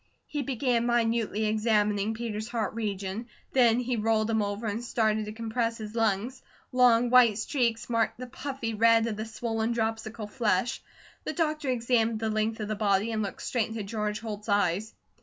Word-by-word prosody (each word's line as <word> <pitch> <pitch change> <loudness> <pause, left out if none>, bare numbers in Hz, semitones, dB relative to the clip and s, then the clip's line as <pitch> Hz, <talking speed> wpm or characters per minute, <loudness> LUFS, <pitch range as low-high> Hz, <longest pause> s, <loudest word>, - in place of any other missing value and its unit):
HE 295 - -3
began 245 -2 0
minutely 230 -2 +1
examining 215 -1 +1
Peter's 220 -2 -4
heart 230 -4 -2
region. 205 0 -3 0.3
Then 240 -2 +5
he 250 -1 -1
rolled 220 0 +1
him 220 -1 +2
over 205 +2 -3
and 220 +2 -2
started 220 -2 +1
to 210 - -6
compress 230 +1 -2
his 215 -1 -7
lungs. 225 +3 0 0.3
Long 245 -1 +4
white 240 -5 +6
streaks 235 -1 0
marked 230 -2 0
the 255 - -6
puffy 255 -2 -5
red 230 +1 +4
of 225 -2 -2
the 215 +1 -4
swollen, 225 +1 -2
dropsical 225 -1 -2
flesh. 210 +1 0 0.4
The - - -3
doctor 305 -4 -1
examined 230 -2 +1
the 220 0 -1
length 215 +1 -1
of 215 - -3
the 215 - -2
body, 205 +1 +1
and 220 -1 -1
looked 200 - -5
straight 235 -4 0
into 225 -1 -4
George 210 +1 -3
Holt's 215 -1 -6
eyes. 200 +1 +1
225 Hz, 175 wpm, -28 LUFS, 215-235 Hz, 0.4 s, white